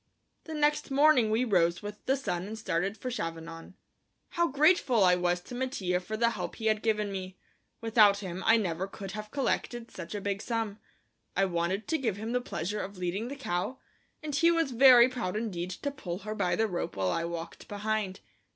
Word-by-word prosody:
The 320 - -6
next 295 0 +1
morning 275 -4 +5
we 225 +4 +2
rose 175 -4 +2
with 205 0 -7
the 270 +1 +3
sun 180 -8 -3
and 220 +1 -6
started 195 -1 -1
for 255 - -4
Chavanon. 165 -4 -6 0.5
How 345 0 +1
grateful 280 - +4
I 180 -1 +6
was 180 0 +1
to 210 - -11
Mattia 245 -8 -1
for 215 +4 -5
the 235 +1 +3
help - - -5
he 225 - -7
had 215 -1 +2
given 210 -2 0
me; 185 -1 -6 0.4
without 215 -3 +5
him 185 -2 -5
I 225 - +7
never 185 -3 -1
could 195 -1 -8
have 210 +1 -6
collected 240 -2 -2
such - - -7
a - - -2
big 200 0 -2
sum. 225 -3 -2 0.6
I 195 - +4
wanted 185 +3 -1
to 320 - 0
give 225 -7 -1
him 220 +2 -4
the 250 0 +1
pleasure 210 -2 -3
of 200 0 -7
leading 185 +5 -2
the 275 - -5
cow, 210 -2 -2 0.5
and 300 -1 -4
he 335 +3 +5
was 330 -5 +2
very 245 -1 +8
proud 245 -7 -3
indeed 190 -6 -3
to 280 +10 -4
pull 185 -11 -5
her 215 - -3
by 180 -4 0
the 225 - +2
rope 180 - -3
while 95 -2 0
I 165 - -1
walked 170 -1 -6
behind. 205 -2 -2
210 Hz, 205 wpm, -29 LUFS, 180-245 Hz, 0.6 s, very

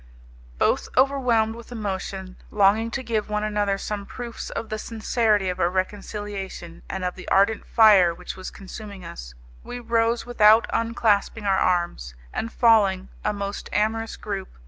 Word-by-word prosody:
Both - - +1
overwhelmed 250 -5 +3
with 235 +1 -12
emotion, 190 -4 -5
longing 210 +3 +3
to 260 +2 -4
give 220 -3 -2
one 210 0 -1
another 205 -2 0
some 200 0 -5
proofs 240 -2 -7
of 225 - -5
the 215 - -3
sincerity 220 -2 +1
of 180 - -2
our 170 - +3
reconciliation 195 -2 -4
and 190 -1 -3
of 180 - -1
the 185 - -11
ardent 200 +2 +3
fire 205 -6 +6
which 170 - -8
was 185 - -7
consuming 200 -1 -10
us, - - -9 0.3
we 245 - -6
rose 230 0 +1
without 220 -2 +5
unclasping 225 -2 +1
our 195 -1 +3
arms, 170 - 0 0.2
and 230 - -3
falling 205 -6 +3
(a 210 - +1
most 200 -1 -5
amorous 225 +1 0
group!) 195 -3 -5
210 Hz, 155 wpm, -24 LUFS, 190-225 Hz, 0.3 s, fire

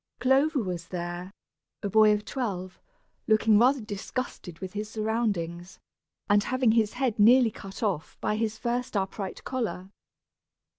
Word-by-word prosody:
Clover 270 +1 +3
was 175 -3 -4
there, 175 +1 -5 0.5
a - - 0
boy 215 0 +6
of 210 0 0
twelve, 190 -8 -4 0.5
looking 215 -1 +4
rather 255 +3 +4
disgusted 210 -3 -5
with 185 0 -7
his 210 +1 -4
surroundings, 205 -6 -2 0.5
and 205 0 +4
having 255 -1 +2
his 220 -2 +2
head 245 -4 -1
nearly 235 +2 +6
cut 195 +2 -9
off 185 -7 -2
by 210 - 0
his 220 0 -1
first 240 -2 -2
upright 195 0 -4
collar. 220 -7 -3
215 Hz, 140 wpm, -27 LUFS, 190-235 Hz, 0.5 s, boy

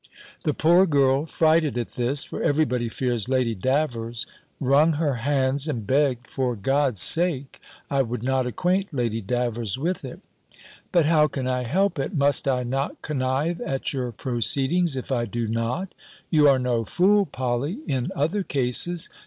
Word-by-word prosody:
The 150 - +1
poor 175 +4 +4
girl, 140 -1 +2
frighted 160 -4 +2
at 120 - -3
this 130 +4 0
(for - - -6
every 155 +2 +2
body 125 -4 -2
fears 120 -1 -2
Lady 130 -3 +1
Davers), 120 0 -1 0.3
wrung 145 +4 +3
her 145 -4 -1
hands, 135 +1 +1
and 120 -9 -3
begged, 130 0 +1
for 125 -3 -2
God's 135 +1 0
sake, 160 -6 +1 0.3
I 140 -1 +1
would 120 -2 -4
not 130 0 0
acquaint 185 +4 -1
Lady 115 -3 -1
Davers 120 0 -1
with 175 +7 -2
it. - - -8 0.7
"But 170 -4 +3
how 155 -1 +4
can 135 -3 -4
I 125 -1 -1
help 180 +5 0
it? 140 +7 -3
Must 140 -1 +2
I 125 -2 +1
not 135 +3 -3
connive 145 +3 -1
at 135 +1 -2
your 125 -3 -3
proceedings, 135 +8 0
if 130 +1 -6
I 120 -3 0
do 115 +1 -3
not? 115 - -2 0.4
You 150 -3 +5
are 135 - +4
no 125 -2 0
fool, 195 - +2
Polly, 130 - -3
in 130 -2 -1
other 165 +9 0
cases. 145 +3 +1
135 Hz, 165 wpm, -24 LUFS, 125-155 Hz, 0.7 s, You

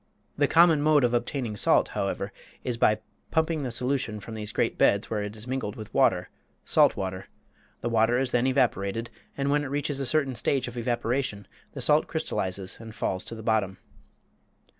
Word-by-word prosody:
The 145 -1 +2
common 165 -2 +5
mode 150 -2 +4
of 120 -1 +2
obtaining 120 -1 -1
salt, - - +3
however, - - -3 0.3
is 125 - -2
by 110 -2 +2 0.3
pumping 160 -1 +1
the 130 - -2
solution 125 -2 -1
from 110 +2 -9
these 105 -1 -5
great - - 0
beds 100 +2 +2
where 105 -2 0
it 105 +1 -5
is 110 - -9
mingled 130 -5 -3
with 110 -2 -9
water - - +3 0.4
salt - - +4
water; 95 -1 -4 0.5
the - - -2
water 115 +1 +3
is 130 -1 0
then 125 +1 +2
evaporated, 115 -4 0 0.3
and 140 0 0
when 145 0 +2
it - - -4
reaches 145 0 -2
a 135 - -1
certain 140 0 +1
stage 130 +2 0
of 120 - -8
evaporation 120 -2 -1 0.3
the - - -2
salt - - +4
crystallizes 95 0 -3
and 110 -1 -10
falls 95 - -2
to 115 - -6
the 110 - -9
bottom. 105 -4 0
120 Hz, 185 wpm, -27 LUFS, 105-135 Hz, 0.5 s, common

